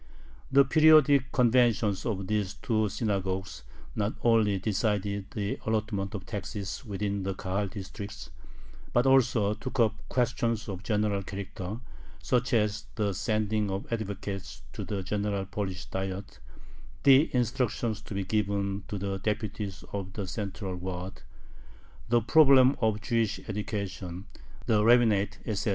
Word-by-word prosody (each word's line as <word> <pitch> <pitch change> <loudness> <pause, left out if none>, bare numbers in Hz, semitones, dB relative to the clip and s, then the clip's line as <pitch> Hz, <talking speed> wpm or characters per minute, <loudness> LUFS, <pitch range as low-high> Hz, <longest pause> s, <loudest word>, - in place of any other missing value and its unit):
The 140 0 +6
periodic 150 -3 +6
conventions 120 -5 +3
of 100 -4 -2
these 105 -1 -1
two 110 -3 0
"synagogues" 95 -3 -2 0.3
not 105 +1 -1
only 110 -4 +4
decided 100 0 -1
the 100 0 -3
allotment 105 -2 -1
of 95 - -6
taxes 105 +1 -5
within 100 -2 -2
the 95 0 -2
Kahal 95 +2 -2
districts, 100 +1 -8 0.6
but 120 +1 +3
also 125 -6 +4
took 125 +4 -6
up 110 -3 +4 0.2
questions 115 -2 0
of 95 -3 -4
a - - -16
general 105 -1 0
character, 100 +1 -6 0.4
such 125 -1 +1
as 105 -2 0
the 105 -3 0
sending 105 +1 0
of 95 +4 -4
advocates 100 -3 -5
to - - -5
the 100 -2 -3
general 100 0 -1
Polish 95 -2 -4
Diet, 95 +1 -5 0.6
the 140 +3 +6
instructions 120 -3 0
to 105 - -8
be 100 - -1
given 100 -1 -1
to 105 - -4
the 95 0 -3
deputies 105 -1 -3
of 95 -2 -4
the 100 -2 -4
central 95 -1 -4
Waads, 90 +1 -6 0.9
the 120 0 +4
problem 135 0 +6
of 110 -2 +1
Jewish 115 -1 0
education, 100 -3 -4 0.4
the 105 -2 +3
rabbinate, 110 -4 +4
etc. 105 -1 -1
105 Hz, 135 wpm, -29 LUFS, 100-115 Hz, 0.9 s, The